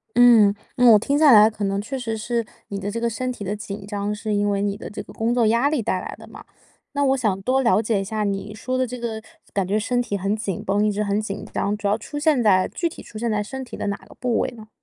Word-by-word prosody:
嗯， 230 -4 +7 0.2
那 250 -2 +6
我 210 - +7
听 280 +6 0
下 300 -3 +6
来 215 0 +8
可 210 -1 -6
能 195 0 0
确 265 +5 -5
实 225 -3 -3
是 230 +1 -2 0.2
你 200 -1 -4
的 200 +1 -3
这 230 +3 -3
个 235 0 0
身 255 +3 -3
体 210 - -7
的 200 +2 -2
紧 205 -2 -7
张， 205 0 -3
是 215 0 -3
因 205 0 +1
为 200 0 0
你 200 0 -1
的 - - -8
这 205 - -7
个 - - -14
工 230 +2 0
作 240 -2 +3
压 235 +6 +3
力 300 -6 0
带 185 -3 -1
来 - - -7
的 - - -13
嘛。 - - -12 0.5
那 285 0 +1
我 270 0 +3
想 215 -6 0
多 260 +3 +2
了 235 -3 +3
解 215 -3 0
一 - - -2
下 215 +1 -2
你 200 +1 -3
说 255 +4 -3
的 255 -1 +1
这 250 +1 -6
个 225 -2 -4 0.3
感 195 -3 0
觉 205 - +1
身 245 +3 0
体 205 -4 -2
很 195 +3 -1
紧 210 -4 -4
绷， 205 +2 +2
一 210 - +2
直 210 +1 -1
很 205 +1 0
紧 200 -2 -5
张， 205 +1 -1
主 205 -1 -2
要 205 +2 +2
出 290 +7 -8
现 295 -4 +3
在 190 -4 +4
具 340 - -1
体 - - -11
出 215 - -11
现 235 0 -1
在 210 -1 0
身 265 +5 -6
体 245 - -9
的 205 - -3
哪 200 - -1
个 - - -17
部 245 -3 0
位 - - 0
呢？ 215 0 -12
215 Hz, 315 characters per minute, -23 LUFS, 205-245 Hz, 0.5 s, 来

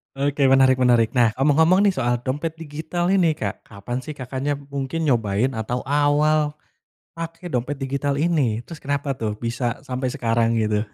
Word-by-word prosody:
Oke 140 0 +1
menarik 130 -1 +5
menarik. 120 -3 +4
Nah, 120 -3 +2
ngomong-ngomong 160 +8 +4
nih, 200 - +4
soal 120 -8 0
dompet 150 +5 -3
digital 165 +3 -3
ini, 175 -5 +3
Kak, 100 -7 -5
kapan 115 +4 -5
sih 150 +3 -8
Kakaknya 135 +2 -3
b 140 - -12
mungkin 140 +4 -3
nyobain 115 -2 +1
atau 120 +2 -3
awal 150 +2 +2 0.6
pake 165 +1 -7
dompet 130 +1 -1
digital 140 +1 -2
ini, 140 -7 +1
terus 165 +2 -10
kenapa 140 -1 -2
tuh, 105 -2 -2
bisa 120 +3 -3
sampai 130 -1 -3
sekarang 115 0 +1
gitu? 110 -1 0
135 Hz, 165 wpm, -22 LUFS, 120-150 Hz, 0.6 s, menarik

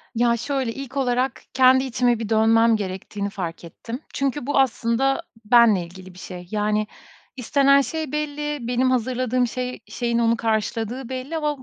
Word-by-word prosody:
Ya, 235 0 +2
şöyle, 265 -1 -2
ilk 275 +1 -7
olarak 255 -1 0
kendi 260 0 +5
içime 245 -2 +1
bir 225 -2 -4
dönmem 225 +1 +4
gerektiğini 200 0 -4
fark 175 -5 -6
ettim 230 - -8
çünkü 275 -1 -2
bu 280 0 +1
aslında 265 +3 +1 0.2
benimle 225 -4 +5
ilgili 185 +1 -13
bir 180 - -14
şey. 180 -1 -9
Yani, 210 0 0 0.5
istenen 275 +2 +4
şey 315 0 -4
belli, 295 -3 -3
benim 250 +1 +1
hazırladığım 255 0 0
şey 250 +1 -4
şeyin 235 -1 -1
onu 230 0 +2
karşıladığı 225 +3 -2
belli 260 +5 -4
ama 300 -2 -1
245 Hz, 155 wpm, -23 LUFS, 220-270 Hz, 0.5 s, kendi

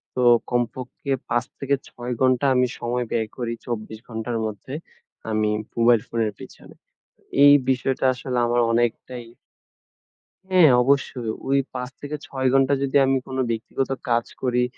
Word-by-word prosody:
তো 125 - 0 0.3
কমপক্ষে 125 +3 -3 0.2
৫ 120 +1 +1
থেকে 140 0 +1
৬ 125 0 -7
ঘণ্টা 130 +1 +3
আমি 125 0 +3
সময় 120 +1 -2
ব্যয় 110 -2 -1
করি, 120 -2 -2
২৪ 110 -2 -5
ঘণ্টার 115 +1 -3
মধ্যে 110 +5 -6 0.6
আমি 110 -1 +1 0.3
মোবাইল 115 -1 +5
ফোনের 115 -2 -1
পেছনে। - - -13 0.7
এই 145 - +9 0.2
বিষয়টা 130 +1 0
আসলে 125 0 -4
আমার 120 0 +2
অনেকটাই 120 +1 -1 1.2
হ্যাঁ, 180 -5 +6
অবশ্যই 130 -3 0 0.2
ওই 140 - +3 0.2
৫ 125 0 -4
থেকে 145 +1 -4
৬ 130 -1 -1
ঘণ্টা 135 +1 +4
যদি 135 - -2
আমি 135 0 +2
কোনো 130 0 -2
ব্যক্তিগত 115 +4 -2 0.2
কাজ 120 0 +2 0.2
করি 125 -1 +1
125 Hz, 140 wpm, -23 LUFS, 115-130 Hz, 1.2 s, এই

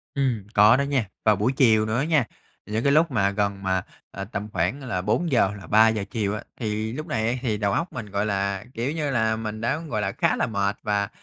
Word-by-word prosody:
Ừm, 130 -7 0
có 105 +3 +7
đó - - +1
nha, 140 -5 0 0.2
vào 105 -1 +5
buổi 110 +6 +1
chiều 110 -5 +4
nữa 110 +2 -1
á 140 - 0
nha, 155 -7 +2 0.4
những 110 +3 -2
cái 140 - +3
lúc 155 +1 +4
mà 100 -4 +2
gần 100 -1 -2
mà, 95 -1 +1 0.3
ờ, 100 - -6
tầm 105 0 -5
khoảng 95 +11 -1
là 95 -8 -2
4:00 110 - +1
là 95 - -11
3:00 110 -1 +4
chiều 105 -4 -1
á, - - -6 0.2
thì 110 0 -2
lúc 155 +4 -6
này 110 -5 -1
á 125 - 0
thì 110 -4 -1
đầu 100 -1 0
óc 165 - -1
mình, 120 -4 -5
gọi 100 +1 0
là, 100 -1 -1
kiểu 120 +5 -2
như 150 -3 -2
là, 110 -3 +1
mình 110 0 -5
đã, 135 +6 0
gọi 145 -10 -3
là, 95 -1 -1
khá - - +1
là - - 0
mệt 100 -2 0
và, 100 -1 0
110 Hz, 245 wpm, -24 LUFS, 100-130 Hz, 0.4 s, có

